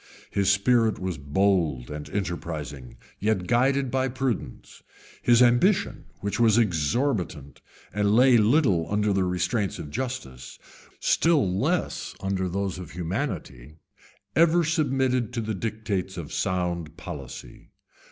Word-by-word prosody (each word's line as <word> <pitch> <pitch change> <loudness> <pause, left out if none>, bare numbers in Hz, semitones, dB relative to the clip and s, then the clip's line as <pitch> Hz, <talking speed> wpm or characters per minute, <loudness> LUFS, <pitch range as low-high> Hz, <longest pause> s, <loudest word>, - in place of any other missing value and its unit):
His 100 -1 +1
spirit 110 +2 +3
was 90 -5 -4
bold 75 -4 +1
and 75 0 -6
enterprising, 80 -9 -5 0.2
yet 105 -3 0
guided 130 +4 +2
by 130 0 +1
prudence; 125 - -4 0.4
his 120 +1 +5
ambition, 145 - +2 0.2
which 100 +2 -2
was 115 -2 +5
exorbitant, 90 - 0 0.3
and 105 +1 +2
lay 125 +1 +6
little 105 - +2
under 105 0 +1
the 95 -1 +1
restraints 90 +3 -1
of 75 - -8
justice, 110 - -5 0.4
still 160 - +3
less 90 +2 -1
under 95 -1 -1
those 95 0 -2
of 90 -4 -8
humanity, 80 -6 -4 0.6
ever 170 +2 +4
submitted 130 -6 +1
to 120 - -2
the 110 0 -3
dictates 105 -2 -3
of 80 -4 -6
sound 85 -3 -2
policy. 70 -7 -9
100 Hz, 125 wpm, -26 LUFS, 85-120 Hz, 0.6 s, lay